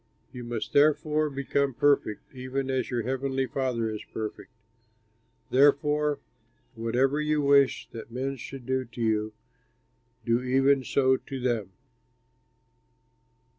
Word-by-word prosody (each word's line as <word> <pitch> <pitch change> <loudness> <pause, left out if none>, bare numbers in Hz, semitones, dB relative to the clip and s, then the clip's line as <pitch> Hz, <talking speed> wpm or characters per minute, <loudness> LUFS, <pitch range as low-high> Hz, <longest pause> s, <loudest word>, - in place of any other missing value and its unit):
You 125 -1 -7
must 120 -2 -5
therefore 150 +1 +3
become 140 -1 -1
perfect, 140 -7 +1
even 130 +1 -3
as 130 -1 -1
your 120 -2 -1
heavenly 135 +1 -1
Father 125 -2 -1
is 110 -1 -5
perfect. 110 +3 -6 1.0
"Therefore, 145 +2 +3 0.6
whatever 130 +6 +1
you 150 -1 +1
wish 140 -1 +4
that 115 0 -8
men 130 +3 -3
should 130 +1 -9
do 130 0 0
to 120 0 -13
you, 110 -1 0 0.9
do 115 +1 +2
even 135 +2 +3
so 130 +1 +2
to 135 0 -7
them." 115 -7 -1
130 Hz, 120 wpm, -27 LUFS, 120-140 Hz, 1.0 s, wish